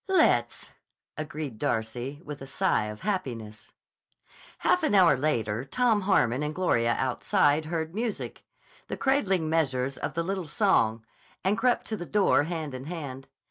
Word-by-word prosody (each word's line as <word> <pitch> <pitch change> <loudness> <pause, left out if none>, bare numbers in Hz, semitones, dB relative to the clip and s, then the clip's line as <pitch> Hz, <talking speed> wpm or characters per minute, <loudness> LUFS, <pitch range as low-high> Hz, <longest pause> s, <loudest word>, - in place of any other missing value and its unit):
"Let's," 380 - +2 0.4
agreed 150 -6 -5
Darcy 120 +7 -2
with 145 -2 -7
a 135 - -7
sigh 135 - +1
of 105 0 -7
happiness. 120 - -4 0.9
Half 360 - +2
an 310 -10 +2
hour 180 -6 +6
later 120 -6 -1
Tom 225 - +1
Harmon 135 - +2
and 150 +1 -2
Gloria 115 -11 +2
outside 145 +3 +2
heard 160 0 -3
music, 225 +1 -4 0.4
the - - -4
cradling 195 - +1
measures 135 -5 0
of - - -4
the 170 - 0
little 190 -1 -3
song, 115 - +2 0.4
and 195 +2 +2
crept 245 +2 +1
to 220 - -3
the 175 - -7
door 200 -8 +3
hand 160 -4 -4
in 130 +1 -7
hand. 140 -5 -6
155 Hz, 150 wpm, -27 LUFS, 130-190 Hz, 0.9 s, hour